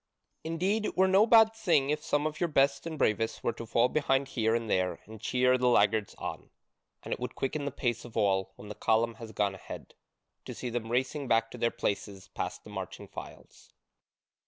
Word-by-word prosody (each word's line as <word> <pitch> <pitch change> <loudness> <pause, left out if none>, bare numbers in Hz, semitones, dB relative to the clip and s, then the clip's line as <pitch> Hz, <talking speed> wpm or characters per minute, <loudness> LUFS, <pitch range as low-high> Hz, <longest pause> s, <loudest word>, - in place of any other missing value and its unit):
Indeed, 185 +7 0
it - - -6
were 190 +1 +5
no 195 +4 +5
bad 225 -1 +7
thing 165 -10 +2
if 150 0 -2
some 145 +1 0
of 155 0 -3
your 175 - +2
best 140 +1 +2
and 160 -1 -5
bravest 110 -3 0
were 115 - 0
to 115 0 -8
fall 115 +2 +3
behind 135 -1 +1
here 110 -3 +1
and 115 -1 -2
there 95 -3 0
and 110 0 -11
cheer 125 +1 +2
the 125 - +2
laggards 105 -2 +3
on: - - -6 0.5
and - - -3
it - - -5
would - - -5
quicken 140 +2 -2
the 140 - -2
pace 120 -2 -2
of 120 - -9
all, 95 -2 +2
when 105 - -12
the 105 - -6
column 115 +2 +1
has 115 -1 -7
gone 100 -2 0
ahead, 95 - -9 0.5
to - - -7
see 125 - -5
them 115 -1 -3
racing 130 +3 -1
back 115 -1 +2
to - - -8
their 115 - +2
places 100 -3 -4
past - - -5
the - - -12
marching - - -6
files." - - -11
125 Hz, 210 wpm, -30 LUFS, 110-150 Hz, 0.5 s, bad